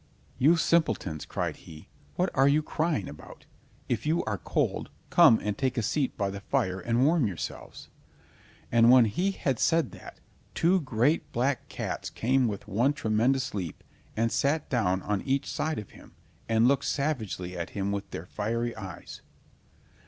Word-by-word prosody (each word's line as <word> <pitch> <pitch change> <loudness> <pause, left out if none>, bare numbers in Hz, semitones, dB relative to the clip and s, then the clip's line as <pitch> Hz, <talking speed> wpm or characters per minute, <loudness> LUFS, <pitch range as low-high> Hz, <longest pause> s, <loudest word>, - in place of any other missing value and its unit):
"You 155 +6 +5
simpletons!" 110 - +1
cried - - -3
he, 80 -1 -13 0.3
"what 180 +1 0
are 135 +1 +4
you 150 +2 +3
crying 155 - -1
about? 75 - -12 0.4
If 120 +2 -2
you 165 +2 +2
are 105 -2 -2
cold, - - -1 0.2
come 110 - +7
and 105 -1 -1
take 130 +1 -1
a 115 - +1
seat 135 +5 -1
by 100 -2 -1
the 100 - -6
fire 95 -1 -1
and 120 +7 +1
warm 155 -5 +3
yourselves." 80 -8 -7 0.8
And 115 0 +5
when 125 -1 +8
he 175 - 0
had 135 - -2
said 165 -5 +2
that, - - -12 0.4
two 180 +3 +3
great 130 +3 +1
black 130 +3 -1
cats - - -4
came 130 +2 +1
with 100 -3 -5
one 120 +8 +2
tremendous 130 +2 +1
leap 90 -6 -5 0.3
and 115 +1 +1
sat 150 +2 0
down 95 -7 +1
on 105 -2 -1
each 135 0 0
side 160 0 -2
of 105 - -7
him, - - -16 0.4
and 115 +1 +4
looked 140 +1 +2
savagely 110 - -2
at 85 +1 -4
him 100 0 -1
with 100 0 -4
their 80 - -7
fiery 115 +5 -2
eyes. 95 -2 -9
120 Hz, 165 wpm, -28 LUFS, 100-140 Hz, 0.8 s, when